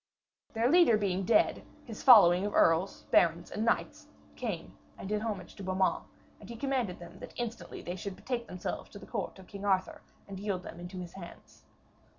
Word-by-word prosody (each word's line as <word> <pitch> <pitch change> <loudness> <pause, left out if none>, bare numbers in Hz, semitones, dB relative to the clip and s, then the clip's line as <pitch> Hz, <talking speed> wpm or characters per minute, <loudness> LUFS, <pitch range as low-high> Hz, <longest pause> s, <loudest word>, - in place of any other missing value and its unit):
Their 225 +1 +2
leader 320 -6 +6
being 195 -2 -1
dead, 315 - +3 0.2
his 225 -4 -8
following 190 -7 +8
of 205 - -2
earls, 165 +4 +3
barons 170 0 +3
and 215 - -2
knights 230 - -1 0.3
came - - -5 0.2
and - - -7
did 210 +1 -1
homage 205 -5 -4
to 200 - -8
Beaumains, 190 0 0 0.3
and - - -13
he 235 - -6
commanded 250 -7 -1
that 170 -1 -11
instantly 240 -1 -6
they 175 - -4
should 190 +1 -6
betake 240 0 -4
themselves 180 -2 -5
to - - -11
the - - -11
court 200 -5 -4
of 190 - -13
King 200 +2 -9
Arthur 190 -2 0 0.3
and 195 -1 -7
yield 195 -3 -3
them 170 - -9
into 175 +2 -8
his 175 -1 -9
hands. 175 -3 -12
195 Hz, 185 wpm, -31 LUFS, 180-225 Hz, 0.3 s, following